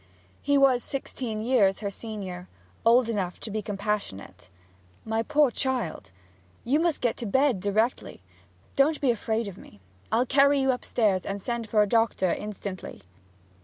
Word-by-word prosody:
He 285 Hz, 0 st, +2 dB
was 265 Hz, -3 st, +4 dB
sixteen 240 Hz, -5 st, -4 dB
years 220 Hz, -6 st, +3 dB
her 200 Hz, -1 st, -3 dB
senior; 190 Hz, -5 st, -7 dB, 0.4 s
old 235 Hz, +1 st, +5 dB
enough 195 Hz, -6 st, -2 dB
to 220 Hz, -, -6 dB
be 215 Hz, +1 st, -2 dB
compassionate. 200 Hz, -, -4 dB, 0.6 s
'My 225 Hz, 0 st, 0 dB
poor 295 Hz, +1 st, +3 dB
child, 260 Hz, -, -2 dB, 0.5 s
you 275 Hz, +6 st, +2 dB
must 335 Hz, -2 st, 0 dB
get 240 Hz, -2 st, 0 dB
to 235 Hz, -, -5 dB
bed 265 Hz, 0 st, +2 dB
directly! 205 Hz, -, -1 dB, 0.5 s
Don't 295 Hz, +3 st, +3 dB
be 270 Hz, -4 st, +3 dB
afraid 225 Hz, 0 st, -2 dB
of 195 Hz, -1 st, -8 dB
me 100 Hz, -, -15 dB, 0.3 s
I'll 240 Hz, +3 st, +3 dB
carry 280 Hz, +2 st, +4 dB
you 265 Hz, 0 st, +3 dB
upstairs, 215 Hz, -6 st, 0 dB
and 200 Hz, +1 st, -4 dB
send 235 Hz, +1 st, -4 dB
for 210 Hz, -1 st, +4 dB
a -, -, -1 dB
doctor 225 Hz, -4 st, +2 dB
instantly.' 200 Hz, -3 st, -7 dB
225 Hz, 155 wpm, -26 LUFS, 200-255 Hz, 0.6 s, old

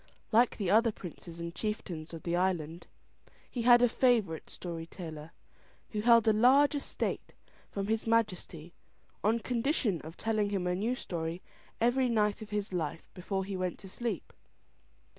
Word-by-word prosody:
Like 235 Hz, +2 st, +4 dB
the 195 Hz, -4 st, 0 dB
other 225 Hz, +2 st, +5 dB
princes 170 Hz, -3 st, -10 dB
and 170 Hz, 0 st, -5 dB
chieftains 175 Hz, -5 st, -4 dB
of 165 Hz, -1 st, -8 dB
the 170 Hz, 0 st, 0 dB
island, 175 Hz, -3 st, -1 dB, 0.6 s
he 245 Hz, -, -2 dB
had 240 Hz, +1 st, +7 dB
a -, -, +7 dB
favourite 230 Hz, -9 st, +1 dB
story 165 Hz, -2 st, -6 dB
teller, 160 Hz, -4 st, -8 dB, 0.6 s
who 210 Hz, -, -1 dB
held 230 Hz, 0 st, +6 dB
a 220 Hz, -, +6 dB
large 260 Hz, +7 st, +5 dB
estate 285 Hz, -, -3 dB, 0.3 s
from 200 Hz, -1 st, -3 dB
his 220 Hz, +2 st, -1 dB
Majesty, 180 Hz, -7 st, 0 dB, 0.5 s
on 220 Hz, +3 st, +3 dB
condition 235 Hz, -, 0 dB
of 160 Hz, +2 st, -10 dB
telling 215 Hz, -2 st, 0 dB
him 195 Hz, -3 st, -1 dB
a 180 Hz, -, +1 dB
new 220 Hz, +7 st, 0 dB
story 170 Hz, -5 st, -4 dB, 0.4 s
every 245 Hz, +2 st, +3 dB
night 210 Hz, -3 st, +1 dB
of 215 Hz, -, -8 dB
his 210 Hz, -2 st, -3 dB
life, 165 Hz, -2 st, -3 dB
before 190 Hz, +1 st, -3 dB
he 195 Hz, 0 st, -4 dB
went 185 Hz, -1 st, -2 dB
to 195 Hz, -, -11 dB
sleep. 215 Hz, -2 st, -4 dB
205 Hz, 160 wpm, -31 LUFS, 175-230 Hz, 0.6 s, had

